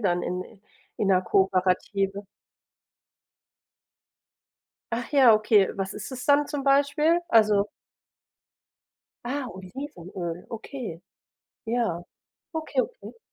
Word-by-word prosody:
dann 180 -4 +1
in 180 0 -2
i 200 -1 -17 0.4
in 205 - 0
‘ner 185 -1 +5
Kooperative. 195 +1 +1 2.7
Ach 235 +1 -3
ja, 255 -6 +7
okay. 215 -2 +4
Was 195 0 -4
ist 210 +5 -7
es 250 -1 -6
dann 285 0 +4
zum 290 -2 -4
Beispiel? 285 +4 +3
Also 210 -3 +4 1.6
Ah, 270 +2 -2
Olivenöl, 185 - -7
okay. 230 - -6 0.6
Ja, 225 -7 -1 0.5
okay, 315 -5 0
okay. - - -8
215 Hz, 100 wpm, -26 LUFS, 190-275 Hz, 2.7 s, ja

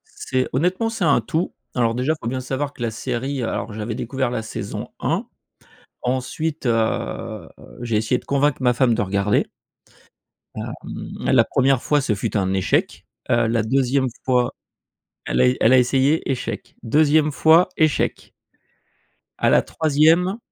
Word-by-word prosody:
C'est 130 -1 -1
honnêtement, 180 - +1
c'est 225 -5 -3
un 140 -6 +4
tout. 160 +10 -2 0.2
Alors 115 -2 +2
déjà, 130 +5 +1
il - - -5
faut 115 - -4
bien 130 0 -2
savoir 135 +3 -3
que - - -14
la 115 -1 -1
série 130 +3 -3
alors 105 -1 -3
j'avais 110 +1 -4
découvert 130 +1 -2
la 115 - -2
saison 110 - -6
1. - - -1 0.8
Ensuite, 130 +4 -2
heu, 115 -1 -1 0.3
j'ai 115 -3 -1
essayé 110 +4 +1
de - - -15
convaincre 140 0 +1
ma 125 -1 +3
femme 125 -2 +3
de 110 - 0
regarder. 100 +1 +1 1.1
Hem, - - -5 0.6
la - - +6
1re 135 -1 +2
fois 145 -1 +2
ce 110 -5 0
fut 100 - -2
un 95 -1 0
échec. 95 -1 0 0.2
Heu, 120 -2 +3
la 115 -1 +1
2e 130 +2 +1 0.2
fois 125 -2 +1 0.7
elle 60 - -1
a 65 - +6
é 65 - +1
elle 115 - +5
a 130 - +7
essayé 135 +5 +2
échec, 130 - -4
2e 150 +4 +3
fois 160 +5 +5
échec. 155 -2 0 1.1
À - - +3
la - - +5
3e 160 +6 +2
130 Hz, 160 wpm, -21 LUFS, 115-145 Hz, 1.1 s, a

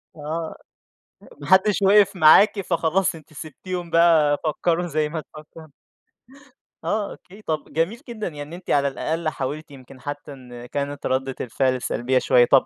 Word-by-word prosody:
آه 160 +2 -5 0.7
أ - - -16
ما 145 - -7
حدش 190 +3 +4
وقف 200 0 +5
معاكِ 195 +6 +6
فخلاص 175 0 0
أنتِ 155 -1 -15
سبتيهم 170 +4 -6
بقى 165 -3 +4
فكّروا 170 +3 0
زي 155 -1 -1
ما 160 0 -4
تفكّروا. 155 +1 -14 1.2
آه 210 -1 -1
أوكي، 200 +4 -14
طَب 155 -6 -4
جميل 170 +9 0
جدًا، 215 -4 -4
يعني 150 -3 -7
إن 150 +3 -8
أنتِ 180 +1 -10
على 140 -1 +3
الأقل 155 +4 -2
حاولتِ 145 +2 -5
يمكن 130 -1 -14
حتى 145 0 -6
إن 125 -2 -11
كانت 140 +2 -4
ردِّة 130 0 -1
الفعل 130 +1 0
سلبية 130 +1 0
شوية، 120 -1 +4
طَب 135 +1 +4
155 Hz, 160 wpm, -23 LUFS, 140-175 Hz, 1.2 s, معاكِ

